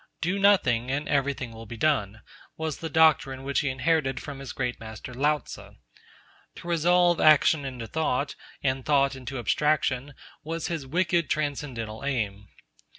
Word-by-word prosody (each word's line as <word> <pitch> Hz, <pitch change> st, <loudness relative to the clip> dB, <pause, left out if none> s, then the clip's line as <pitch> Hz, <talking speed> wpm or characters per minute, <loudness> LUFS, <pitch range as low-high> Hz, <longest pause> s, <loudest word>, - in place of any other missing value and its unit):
'Do 180 Hz, +4 st, -1 dB
nothing, 130 Hz, -, +3 dB
and 145 Hz, +3 st, -2 dB
everything 135 Hz, -3 st, -1 dB
will 115 Hz, 0 st, -10 dB
be 115 Hz, -, -8 dB
done,' 110 Hz, -7 st, 0 dB, 0.3 s
was 160 Hz, -1 st, -3 dB
the 165 Hz, -, -4 dB
doctrine 145 Hz, -4 st, +3 dB
which 140 Hz, +1 st, 0 dB
he 145 Hz, -, 0 dB
inherited 135 Hz, 0 st, 0 dB
from 140 Hz, -2 st, -8 dB
his 135 Hz, -2 st, -7 dB
great 125 Hz, -2 st, -3 dB
master 110 Hz, +3 st, -9 dB
Lao 145 Hz, +4 st, +2 dB
Tzu. -, -, -11 dB, 0.8 s
To -, -, -10 dB
resolve 175 Hz, +1 st, +3 dB
action 155 Hz, -1 st, +5 dB
into 125 Hz, -3 st, -5 dB
thought, 145 Hz, 0 st, -1 dB, 0.3 s
and 130 Hz, -1 st, 0 dB
thought 140 Hz, -1 st, +2 dB
into 130 Hz, +1 st, -6 dB
abstraction, 140 Hz, +2 st, 0 dB, 0.3 s
was 165 Hz, +2 st, -4 dB
his 160 Hz, -6 st, -4 dB
wicked 170 Hz, +2 st, +1 dB
transcendental 135 Hz, -7 st, -3 dB
aim. 105 Hz, -7 st, -2 dB
140 Hz, 150 wpm, -26 LUFS, 125-155 Hz, 0.8 s, action